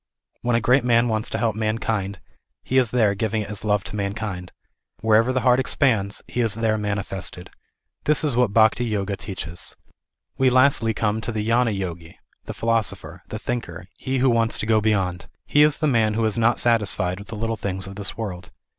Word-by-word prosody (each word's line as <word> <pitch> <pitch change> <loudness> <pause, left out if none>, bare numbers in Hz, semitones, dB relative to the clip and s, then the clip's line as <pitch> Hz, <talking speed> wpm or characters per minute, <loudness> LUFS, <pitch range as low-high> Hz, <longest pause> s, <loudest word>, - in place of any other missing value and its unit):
When 120 -1 +1
a 115 - +2
great 125 +4 +3
man 120 0 +3
wants 110 0 -1
to - - -2
help 110 -2 0
mankind, 110 -3 -2 0.4
He 130 - +2
is 125 -4 +2
there 110 -4 +2
giving 110 +1 -1
it 105 - -8
as 105 - -6
love 105 -2 +1
to 90 - -7
mankind. 100 -3 -4 0.5
Wherever 110 +3 +4
the 130 0 0
heart 125 0 +4
exj 130 - -2
ands, 105 -7 +1
He 125 - -2
is 115 -3 0
there 110 -1 +1
manifested. 100 -3 -4 0.5
This 150 +1 +2
is 145 -5 +1
what 125 0 +4
the 100 - -12
Bhakti 110 +2 +4
Yoga 100 -3 -2
teaches. 95 -4 -7 0.6
We 130 -1 +5
lastly 125 -3 +3
come 110 +1 0
to 115 - -3
the 110 -1 -3
Gnana 115 -2 +2
Yogi, 85 -3 -6 0.3
the - - -6
philosopher, 100 -7 -2
the 110 - -5
thinker, 110 -8 -5
he 130 0 -3
who 130 0 +3
wants 115 -1 +2
to - - -3
go 110 -1 +3
beyond. 95 -4 0 0.2
He 145 - +3
is 150 0 +4
the 155 - -1
man 115 -6 +2
who 115 0 +1
is 110 - +1
not 115 +1 +2
satisfied 105 -6 +1
with 100 - -11
the 110 - -7
little 115 +1 -1
things 95 -3 -2
of 100 0 -8
this 100 0 -4
world. 95 -5 -5
110 Hz, 210 wpm, -23 LUFS, 100-115 Hz, 0.6 s, We